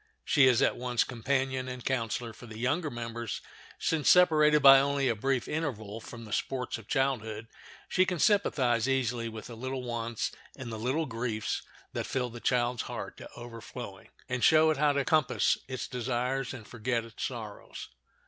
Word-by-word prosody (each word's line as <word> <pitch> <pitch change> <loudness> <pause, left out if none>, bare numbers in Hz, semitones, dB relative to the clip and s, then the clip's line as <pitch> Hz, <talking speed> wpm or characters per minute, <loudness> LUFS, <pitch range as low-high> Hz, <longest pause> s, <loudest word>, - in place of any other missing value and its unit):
She 140 -3 +5
is 125 -3 +4
at - - +2
once 125 -1 +1
companion 130 +1 -1
and 125 -1 -7
counselor 115 -2 -1
for 120 - -12
the 110 -1 -9
younger 145 +7 0
members, 115 -2 -5 0.4
since 155 -3 +1
separated 155 -4 +6
by 135 -1 +10
only 140 0 +1
a 120 - +2
brief 130 +3 0
interval 115 -9 -3
from 115 +1 -9
the 105 - -7
sports 125 -3 -2
of 110 - -15
childhood 115 -5 -1 0.4
she 185 0 +2
can 180 - -1
sympathize 130 - +2
easily 120 -3 0
with 110 -1 -8
the 120 - -8
little 130 +2 -4
wants 115 -2 -2 0.3
and 125 -4 -6
little 125 +9 -1
griefs 115 -3 -2 0.3
that - - -3
fill 125 -2 -1
the 120 - -8
child's 120 +1 +1
heart - - -5
to - - -10
overflowing, 115 -4 -9 0.2
and 125 -1 -2
show 160 0 +6
it 155 - -1
how 150 0 +4
to 140 -1 0
compass 155 -3 +2
its 130 -1 -4
desires 125 +1 -2
and 120 -5 -9
forget 120 0 -2
its 115 - -8
sorrows. 110 -5 -6
125 Hz, 175 wpm, -30 LUFS, 115-135 Hz, 0.4 s, by